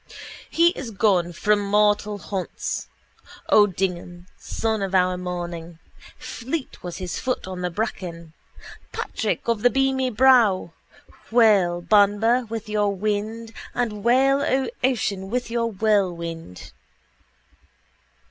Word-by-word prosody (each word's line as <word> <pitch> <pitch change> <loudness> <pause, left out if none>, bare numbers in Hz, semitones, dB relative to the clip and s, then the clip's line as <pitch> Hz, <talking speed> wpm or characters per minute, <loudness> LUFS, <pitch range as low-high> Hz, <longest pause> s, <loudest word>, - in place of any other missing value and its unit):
He 335 +1 +4
is 275 -8 -6
gone 190 -5 +1
from 210 +4 +1
mortal 210 0 +2
haunts: 195 -2 -4 0.6
O'Dignam, 180 -3 +1
sun 220 -2 -2
of 195 -1 -2
our 185 0 +3
morning. 175 -2 -6 0.4
Fleet 260 +4 -5
was 175 -1 -6
his 180 -2 -4
foot 255 -1 -2
on 185 -1 -6
the 180 - -1
bracken: 170 -4 -5 0.6
Patrick - - -3
of 230 -3 0
the 245 - +5
beamy 265 0 +1
brow. 230 -8 +4 0.6
Wail, 200 -7 +4
Banba, 215 +5 +3
with 225 -1 -5
your 210 -1 +1
wind: 215 +3 -3 0.2
and 215 -4 -2
wail, 270 +4 +4
O 265 -1 0
ocean, 205 -7 0
with 245 +1 -2
your 230 0 0
whirlwind. 175 - -1
210 Hz, 115 wpm, -23 LUFS, 180-230 Hz, 0.6 s, the